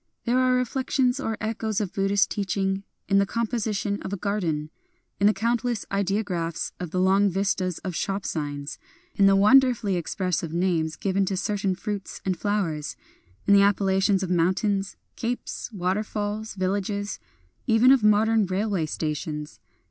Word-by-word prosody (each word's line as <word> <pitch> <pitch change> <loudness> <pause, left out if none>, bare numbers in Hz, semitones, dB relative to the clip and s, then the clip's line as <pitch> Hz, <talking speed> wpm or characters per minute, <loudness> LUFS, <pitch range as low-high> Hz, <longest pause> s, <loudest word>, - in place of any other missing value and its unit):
There 245 +1 +2
are 255 0 +3
reflections 255 +1 0
or 225 -5 -2
echoes 220 -1 -2
of 200 -4 -3
Buddhist 195 +1 +2
teaching 195 -1 -1 0.3
in 195 0 +4
the 200 - +3
composition 215 -3 -1
of - - -6
a 200 - -2
garden; 170 -7 -2 0.2
— - - -46
in 200 - +5
the - - +6
countless 235 +2 -1
ideographs 195 -4 -1
of 180 -2 -4
the 180 - -2
long 195 +2 +4
vistas 185 -2 -1
of 185 - -2
shop 195 +4 -2
signs; 145 -2 -4 0.2
— - - -34
in 195 - +6
the 195 - +5
wonder 255 +6 +6
fully 200 -4 -1
expressive 175 -1 -2
names 170 -3 0
given 195 +2 0
to 190 0 -2
certain 195 0 -1
fruits 200 +1 -5
and 190 -1 +1
flowers; 170 -7 -2 0.3
— 90 +3 -34
in 200 - +6
the 200 - +7
appellations 195 -1 +2
of 185 - -3
moun 175 +1 +3
tains, 200 -2 -1 0.2
capes, 240 +1 -4
waterfalls, 210 +2 -2
villages, 200 +2 -2 0.2
— - - -35 0.2
even 235 +2 +6
of 265 -5 +4
modern 215 0 +4
railway 190 -3 -1
stations. 150 -1 -4
200 Hz, 165 wpm, -25 LUFS, 185-215 Hz, 0.3 s, the